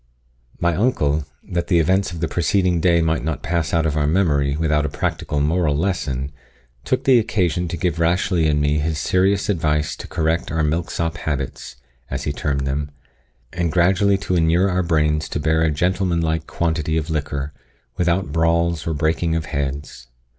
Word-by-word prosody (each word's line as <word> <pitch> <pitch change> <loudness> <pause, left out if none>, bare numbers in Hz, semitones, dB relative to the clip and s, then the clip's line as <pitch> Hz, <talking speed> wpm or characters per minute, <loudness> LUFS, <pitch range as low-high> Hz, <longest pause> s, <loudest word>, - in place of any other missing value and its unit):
My 85 -1 +1
uncle, 75 - +1 0.2
that 85 -1 -2
the 90 - +3
events 95 +4 +2
of 85 -2 -7
the 80 - +1
preceding 90 +2 +1
day 85 -1 +3
might 80 -1 0
not 80 -4 -3
pass 85 -4 -1
out 80 -1 +2
of 75 -2 0
our 75 -1 +1
memory 75 -5 +2
without 75 -2 +1
a 75 - -1
practical 75 0 -2
moral 75 -1 +1
lesson, 70 -7 -2 0.5
took - - -1
occasion 95 - +2
to 85 - -4
give 85 -1 -1
Rashleigh 85 0 +2
and 75 0 +2
me 75 +1 +1
his 80 +1 -1
serious 95 +6 +1
advice 75 -5 0
to - - -8
correct 80 0 -1
our 80 -1 0
milksop 80 0 -1
habits, 70 -5 -4 0.3
as - - -3
he 75 - -2
termed 70 -2 -2
them, 70 +2 -2 0.6
and 85 -1 -1
gradually 95 +4 +3
to 95 -1 -2
inure 85 +3 +3
our 90 +1 +1
brains 75 -2 +1
to - - -2
bear 80 +1 +1
a 80 - +3
gentlemanlike 85 -1 0
quantity 80 -2 -1
of 80 0 -2
liquor, 75 -1 -3 0.4
without 90 -2 0
brawls 85 +1 +1
or 80 - -1
breaking 80 +2 0
of 80 -1 -2
heads. 70 -2 -4
80 Hz, 175 wpm, -21 LUFS, 75-90 Hz, 0.6 s, the